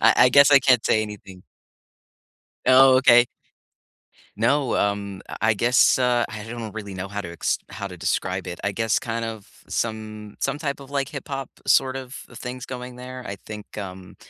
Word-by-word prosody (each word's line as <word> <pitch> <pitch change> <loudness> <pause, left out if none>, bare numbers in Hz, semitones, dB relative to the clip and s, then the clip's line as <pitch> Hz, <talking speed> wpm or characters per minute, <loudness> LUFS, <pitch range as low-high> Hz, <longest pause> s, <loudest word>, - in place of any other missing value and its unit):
I - - +5
I 125 - +7
guess 140 +2 +7
I 140 - +9
can't 125 -3 +4
say 110 - +3
anything. 95 -3 -9 1.2
Oh, 130 0 +7
okay. 120 -2 +6 1.1
No, 125 +5 +1
um, 100 -1 -1 0.2
I 110 - +3
I 110 - +3
guess, 120 +4 +4
uh, 125 -1 +2
I 105 -1 -7
don't 115 -2 -7
really 100 -2 -7
know 95 +1 -5
how 100 +1 -4
to 85 - -7
ex - - -1
how 100 - -6
to 90 - -10
describe 95 +2 -2
it. 90 -1 -6
I 100 - 0
guess 115 0 +1
kind 115 -1 -3
of 110 -3 -7 0.2
some 110 -2 -4
some - - -1
type 145 -3 -3
of, 140 0 -12
like, 140 -1 -1
hip-hop 135 -1 -6 0.2
sort 135 0 +3
of 130 -1 -7
a 120 - -15
things 125 +1 -6
going 125 -1 -7
there, 125 0 -8
I 100 - -4
think, 105 -1 -9
um, 95 -2 -8
115 Hz, 190 wpm, -23 LUFS, 100-130 Hz, 1.2 s, I